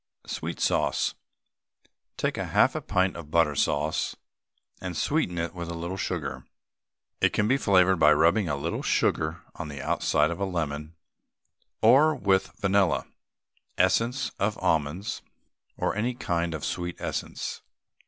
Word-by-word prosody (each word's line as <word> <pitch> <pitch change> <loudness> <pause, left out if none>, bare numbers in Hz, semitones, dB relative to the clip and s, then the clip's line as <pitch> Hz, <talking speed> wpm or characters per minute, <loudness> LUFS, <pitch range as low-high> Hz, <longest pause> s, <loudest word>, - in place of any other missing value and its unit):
SWEET - - -5
SAUCE. - - +1 1.0
Take - - -1
half - - +3
a - - -3
pint 95 +1 +1
of 85 -3 -9
butter 80 -2 +3
sauce, 75 +2 0 0.7
and 90 -3 -4
sweeten 140 - 0
it 85 0 -2
with 85 -2 -6
a 85 - -4
little 85 +3 -4
sugar. - - -3 0.8
It - - +3
can 105 - +2
be 130 - +4
flavoured 95 -7 +4
by 75 -1 +6
rubbing 85 +3 +3
a 75 - 0
little 70 - -3
sugar 80 +1 0
on - - -6
the 70 -2 -7
outside 75 +2 +1
of 85 - -5
a 100 - 0
lemon, 80 -3 -3 0.9
or 155 +4 +6
with 95 -7 +1
vanilla, 95 -2 +2 0.7
essence 115 +9 +2
of 105 +2 0
almonds, 80 +9 -1 0.6
or - - -1
any 120 +4 -1
kind 85 -7 -1
of 75 - -5
sweet 85 0 -3
essence. - - -4
85 Hz, 145 wpm, -27 LUFS, 80-100 Hz, 1.0 s, by